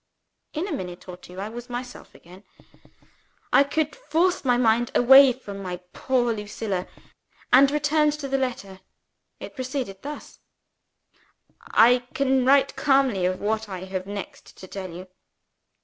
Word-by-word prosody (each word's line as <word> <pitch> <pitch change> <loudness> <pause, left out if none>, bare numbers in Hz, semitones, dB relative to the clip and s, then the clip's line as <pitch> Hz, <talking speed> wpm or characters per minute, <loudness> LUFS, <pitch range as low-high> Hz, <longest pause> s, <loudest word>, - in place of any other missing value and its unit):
In 325 +6 -3
a - - -6
minute 180 - -6
or 180 - -7
two 180 +1 -12
I 200 - -4
was 240 +2 -9
myself 245 +1 -8
again 180 +4 -16 1.1
I - - +7
could 300 +2 -2
force 365 -7 0
my 245 -3 +2
mind 235 0 +2
away 265 +2 +8
from 205 -6 -9
my 180 -2 -5 0.2
poor 245 -3 0
Lucilla, 210 -3 -4 0.7
and 270 +2 +7
return 300 +1 +2
to 295 -1 -4
the 270 0 0
letter. 200 -7 -4 0.6
It - - -9
proceeded 255 -7 -5
thus: 295 +1 -9 1.3
"I 245 +3 +5 0.2
can 265 -1 +2
write 275 0 +4
calmly 265 -10 +2
of 185 0 -3
what 220 +1 -2
I 185 -2 -6
have 190 0 -5
next 200 -2 -8
to 185 - -11
tell 190 0 -7
you. 180 +2 -9
245 Hz, 150 wpm, -24 LUFS, 195-275 Hz, 1.3 s, away